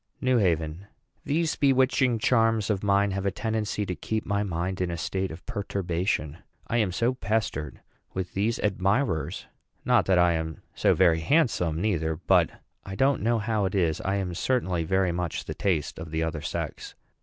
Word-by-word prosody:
NEW 130 -2 +2
HAVEN. 85 -1 0 0.4
These 160 +3 0
bewitching 130 -2 +3
charms 115 -2 +2
of 95 -2 -1
mine 100 0 +2
have 95 +1 -2
a - - +4
tendency 110 0 -2
to 95 - -3
keep 110 +8 -3
my 100 0 0
mind 90 -1 -2
in 90 - 0
a 85 - -3
state 95 +4 -2
of 80 +3 -10
perturbation. 90 -7 -2 0.3
I 120 - -1
am 105 -5 +2
so 115 +7 +1
pestered 105 - -2 0.3
with 95 -1 -4
these 105 +4 0
admirers! 95 - 0 0.4
Not - - +3
that 95 -2 +4
I 90 0 +5
am 80 -1 -4
so - - +3
very 85 -3 +4
handsome 90 - +1
neither; 80 -5 0
but, 90 0 +3 0.3
I 95 - -7
don't 135 +4 +2
know 115 +2 +2
how 110 -2 0
it 95 - -2
is, 85 -5 +1
I 95 +1 -1
am 95 -3 -2
certainly 90 -5 0
very 95 +2 +1
much 85 -1 -3
the - - -4
taste 85 -8 -1
of 80 0 -7
the 80 +1 -1
other 80 -2 -3
sex. - - -5
95 Hz, 180 wpm, -27 LUFS, 85-110 Hz, 0.4 s, I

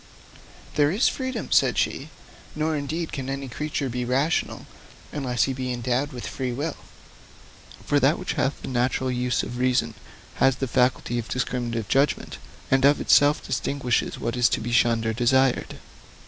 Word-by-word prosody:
'There 145 -1 +3
is 200 - +2
freedom,' 260 -1 -3
said - - +3
she; - - -1 0.5
'nor, 155 +1 0
indeed, 155 +3 -3
can 135 -1 -5
any 135 0 -4
creature 145 +2 -3
be 125 0 -3
rational, 135 +6 0 0.5
unless 125 -6 0
he 135 - 0
be 130 -1 -3
endowed 125 +4 -1
with 125 -3 -7
free 130 -2 -3
will. 145 +5 -3 1.1
For 145 - +2
that 140 +5 +3
which 185 - -3
hath 135 - -1
the - - -5
natural 130 +1 0
use 125 0 0
of 120 +1 -6
reason 125 0 +1 0.4
has 135 -1 +4
the 135 0 -3
faculty 125 -1 +1
of 115 - -6
discriminative 120 -3 -2
judgment, 140 +2 0 0.3
and 135 0 +4
of 145 +1 +5
itself 145 +1 +4
distinguishes 130 -1 -1
what 115 +1 -3
is 120 -2 +4
to - - 0
be 120 +2 -4
shunned 115 -1 +3
or 110 - 0
desired. 130 +2 +2
130 Hz, 165 wpm, -25 LUFS, 120-145 Hz, 1.1 s, of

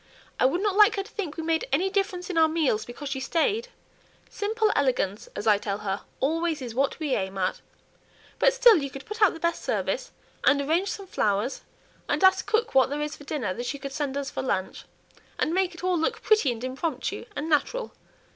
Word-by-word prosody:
I 255 - +5
would 345 +8 -1
not 410 -2 +1
like 420 0 +6
her 395 - -1
to 425 - -16
think 355 -8 -5
we 325 - -3
made 320 0 0
any 330 +8 +2
difference 385 -2 -1
in - - -5
our 320 - +6
meals 310 -9 0
because 245 +4 -8
she 270 -1 -3
stayed. 380 - 0 0.6
'Simple 435 +1 0
elegance,' 245 -8 0
as 205 - -4
I 210 -2 +5
tell 200 -1 -3
her, 195 0 -1 0.2
'always 325 +2 0
is 245 -4 -6
what 270 +3 0
we 300 -4 -1
aim 190 -2 -2
at.' 185 0 -1 0.8
But - - +5
still - - +6
you 280 -3 -2
could 270 +1 -10
put 425 +1 -7
out 405 -5 +5
the - - -9
best 340 +1 -1
service, - - -2 0.3
and 280 0 +5
arrange 325 +8 +1
some 395 - -5
flowers, 210 - 0 0.5
and - - 0
ask 380 0 +5
cook 450 +1 +1
what 265 -1 +5
there 295 +1 -2
is 300 0 -4
for 290 - -14
dinner 275 -10 -2
that 240 +4 -5
she 285 - -3
could 275 0 -7
send 280 -1 -2
us 280 -1 -3
for - - -3
lunch, 190 -8 -2 0.5
and 320 - 0
make 370 -1 +1
it 345 - -11
all 365 -2 +1
look 455 +9 -1
pretty, 430 - +4
and 235 0 -6
impromptu, 260 -1 -3
and 295 +2 -3
natural. 325 - 0
305 Hz, 220 wpm, -26 LUFS, 260-380 Hz, 0.8 s, like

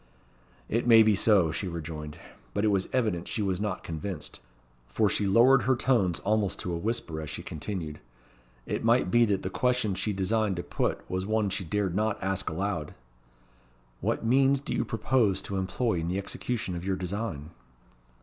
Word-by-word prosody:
"It 115 +2 -1
may 115 -2 +8
be 110 -1 +4
so," 95 -5 +4
she 95 +4 -3
rejoined. 75 -3 -6 0.4
But 100 - +1
it - - +4
was 100 -2 0
evident 105 -9 0
she 110 - -2
was 95 -1 -1
not 105 -3 -2
convinced, 85 +4 -6 0.5
for 80 - +1
she 100 0 +1
lowered 120 +6 +6
her 130 +1 +2
tones 110 - +2
almost 105 +2 +1
to 90 - -3
a - - -1
whisper 85 -6 -2
as 75 - -6
she - - -6
continued. 80 -1 -5 0.7
It - - -3
might 90 - +3
be 120 0 +5
that 100 -3 0
the 95 - -3
question 125 -4 +1
she 100 +3 -1
designed 100 +1 0
to 85 - -4
put - - -2
was 95 +1 -3
one 110 -2 +1
she 95 - -2
dared 95 +1 -1
not 110 +2 0
ask 95 0 -1
aloud. 80 -3 -3 1.0
"What - - -1
means 135 +3 +4
do 140 - -5
you - - +1
purpose 115 -3 +1
to 100 - -4
employ 95 +1 0
in 80 - -3
the 90 +2 -1
execution 100 0 -3
of 85 - -5
your 95 0 0
design?" 90 -5 -4
100 Hz, 185 wpm, -28 LUFS, 90-110 Hz, 1.0 s, may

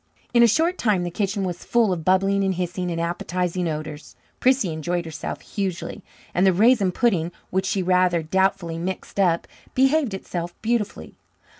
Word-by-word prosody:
In 235 - +6
a 235 - +8
short 330 - +2
time 205 -6 +2
the 175 - -3
kitchen 200 +2 -1
was 180 -2 -4
full 230 -5 +2
of 165 -3 -4
bubbling 195 +3 +3
and 190 -1 +1
hissings 180 0 -2
and 165 - -2
appetizing 175 +1 -1
odours. 155 -1 -6 0.2
Prissy 255 -9 +2
enjoyed 175 +2 -2
herself 160 -2 -6
hugely, 190 0 -4 0.3
and 180 - +2
the 190 - +6
raisin 210 0 +4
pudding, 175 -6 +1 0.2
which 190 +1 0
she 190 0 0
rather 180 -2 +3
doubtfully 190 -1 0
mixed 185 +3 -5
up, 170 -3 +2 0.3
behaved 270 -4 +3
itself 175 -2 -5
beautifully. 225 -2 -2
185 Hz, 165 wpm, -23 LUFS, 175-205 Hz, 0.3 s, a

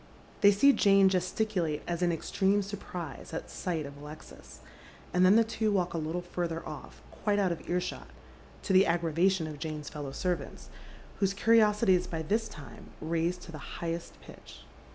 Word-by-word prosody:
They 200 - +8
see 275 +8 +5
Jane 195 -4 +5
gesticulate 185 -3 -1
as 175 0 -2
in 175 -1 +3
extreme 195 +4 +1
surprise 180 -7 -7
at - - -6
sight 165 -5 -3
of 140 0 -9
Alexis, 150 +2 -12 0.5
and 180 - +4
then 185 +3 +7
the 230 - +6
two 220 -1 -1
walk 180 -3 0
a 165 - -1
little 160 +3 -3
further 170 -2 -3
off, - - -9
quite 205 -1 -1
out 195 -3 +2
of 170 - -6
earshot, 180 +1 -2 0.6
to 195 - 0
the 190 +1 +6
aggravation 170 +2 +2
of 150 -2 -7
Jane's 150 -1 -5
fellow 145 -3 -6
servants, 180 +5 -3 0.5
whose 195 -1 +1
curiosity 210 -1 +4
is 180 -1 +1
by 160 -1 -4
this 220 +7 0
time 140 -7 -11
raised 170 +3 -1
to 170 - -10
the 155 - -8 0.2
highest 170 0 -5
pitch. - - -13
180 Hz, 175 wpm, -30 LUFS, 160-195 Hz, 0.6 s, They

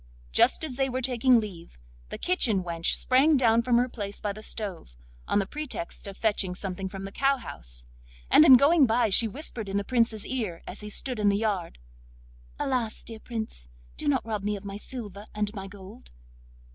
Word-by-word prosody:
Just - - +4
as 270 -6 -3
they 270 -1 +1
were 255 0 -3
taking 250 -1 +4
leave, 180 - -8 0.3
the - - -5
kitchen 235 - +2
wench 170 -1 0
sprang 275 +4 +4
down 230 -2 +4
from 235 0 +2
her 245 +1 +3
place 205 -5 -6
by 205 -1 -2
the 215 - -10
stove, 190 - -5 0.3
on - - +1
the 200 - +2
pretext 290 - -6
of 195 - -8
fetching 205 -4 0
something 190 0 -4
from 195 0 -7
the 195 - -7
cowhouse, 130 - -2 0.4
and 155 - +7
in 260 - +10
going 285 +1 +5
by 230 0 +2
she 225 +4 +4
whispered 230 -3 -5
in 195 - -1
the 200 - 0
Prince's 230 -2 0
ear 215 -10 -3
as 190 - -8
he 210 - -7
stood 250 +2 -3
in 205 -1 +3
the 200 - +2
yard: 205 -6 -2 0.8
'Alas! 245 -5 -2
dear 225 -1 -9
Prince, 220 - -6 0.3
do - - -5
not 145 - +1
rob 215 -2 -3
me 205 +1 -1
of 200 0 -9
my 200 0 -6
silver 210 -2 -8
and 210 0 -1
my 195 -2 -6
gold. 190 - -13
215 Hz, 195 wpm, -27 LUFS, 195-245 Hz, 0.8 s, in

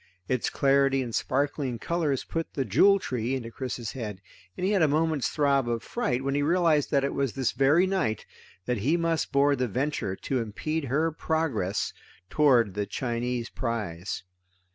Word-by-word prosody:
Its 130 -2 0
clarity 135 -1 +3
and 120 -2 -6
sparkling 140 -1 -1
colors 155 -1 -1
put 165 0 -4
the 135 - 0
Jewel 190 - +5
Tree 125 - -2
into 115 -3 -5
Chris's 120 -3 -4
head 105 -7 -6 0.4
and 180 - -1
he 195 - +2
had 200 -3 +3
a 160 - +5
moment's 155 -1 +1
throb 140 -4 +2
of 115 -1 -2
fright 135 - -1
when 135 0 -1
he 145 - +1
realized 160 -1 +2
that 140 -2 +2
it 140 - -1
was 135 -4 -1
this 130 -3 0
very 145 +7 +4
night 185 - -1 0.4
that 125 -1 0
he 145 +11 +2
must 165 -1 0
board 140 -1 +3
the 125 - +1
Venture 125 -4 -2
to 130 +6 -2
impede 150 +8 -3
her 155 +6 +1
progress 145 - -1 0.4
toward 125 -9 +4
the 105 0 -2
Chinese 120 -1 -2
prize. 105 -8 -3
135 Hz, 175 wpm, -27 LUFS, 120-155 Hz, 0.4 s, Jewel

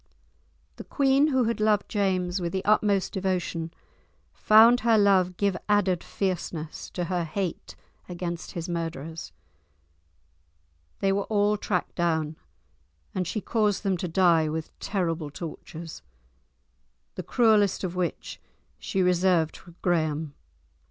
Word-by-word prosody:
The - - -7
queen, 275 +1 +3
who 260 -4 +2
had 230 0 -1
loved 215 -1 +2
James 185 -3 0
with 170 -1 -3
the 190 - -2
utmost 205 -2 +2
devotion, 180 -3 -2 0.6
found 225 +3 +6
her 230 -2 +3
love 190 -3 +3
give 200 -2 +1
added 200 -4 +2
fierceness 170 -5 -4
to 180 - -1
her 175 0 -1
hate 175 +2 -4 0.3
against 175 -1 -5
his 170 -1 -4
murderers. 165 - -5 1.7
They 195 - +2
were 200 0 0
all 210 -1 +2
tracked 195 -3 -2
down, 160 -3 0 0.8
and 185 -2 -2
she 215 +4 -3
caused 210 -3 0
them 195 -2 +1
to 180 - -3
die 165 -3 +3
with 160 0 -4
terrible 165 -6 -2
tortures, 165 +1 -8 1.1
the - - -5
cruellest 215 -6 +3
of 185 -1 -3
which 180 -1 -3 0.4
she 190 -2 -1
reserved 180 -2 +2
for 175 -2 -15
Graham. 155 -4 0
185 Hz, 125 wpm, -26 LUFS, 170-205 Hz, 1.7 s, found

